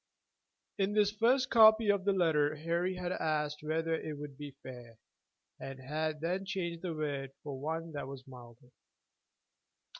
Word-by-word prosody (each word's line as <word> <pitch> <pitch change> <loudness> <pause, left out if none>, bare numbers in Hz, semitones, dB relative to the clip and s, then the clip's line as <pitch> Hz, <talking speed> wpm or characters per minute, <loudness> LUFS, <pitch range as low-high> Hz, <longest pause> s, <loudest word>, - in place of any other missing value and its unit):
(In 200 +1 +1
his 205 -1 +4
first 250 +5 +2
copy 220 -1 +7
of 200 -2 -1
the 200 - +4
letter 155 -5 +2
Harry 170 +4 -1
had 180 -1 -3
asked 150 -3 -1
whether 160 +2 -1
it 155 -2 -3
would 145 -1 -8
be 145 -1 -8
"fair," 120 -3 -10 0.6
and 135 -1 -7
had 155 +3 -3
then 180 +4 -1
changed 175 -4 -3
the 175 -3 -3
word 140 -3 -3
for 140 -3 -5
one 160 +2 -3
that 145 -3 -5
was 135 -1 -9
milder.) 125 -1 -14
155 Hz, 155 wpm, -33 LUFS, 145-185 Hz, 0.6 s, copy